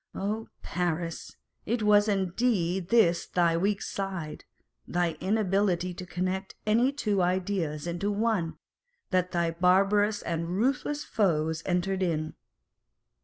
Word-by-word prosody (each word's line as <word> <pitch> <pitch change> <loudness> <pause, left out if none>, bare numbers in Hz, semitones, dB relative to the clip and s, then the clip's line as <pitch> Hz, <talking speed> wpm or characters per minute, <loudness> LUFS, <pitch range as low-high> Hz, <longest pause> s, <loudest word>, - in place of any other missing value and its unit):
Oh, 215 +3 -2 0.2
Paris! 170 -1 -3 0.3
it 230 0 0
was 210 0 +5
indeed 190 -2 +1
on - - -23
this 175 -8 +3
thy 170 -2 +2
weak 195 +4 0
side 190 -6 -5 0.4
(thy 175 -1 +1
inability 190 -2 +1
to 180 +1 -8
connect 185 +2 -3
any 230 +5 +3
two 210 -9 0
ideas 180 -4 -1
into 175 +4 -2
one) 205 -5 0 0.5
that 180 -1 +1
thy 170 -1 +1
barbarous 195 +5 +3
and 165 0 -2
ruthless 275 +5 0
foes 160 -6 0
entered 190 +1 0
in 155 -4 -1
185 Hz, 120 wpm, -28 LUFS, 170-205 Hz, 0.5 s, was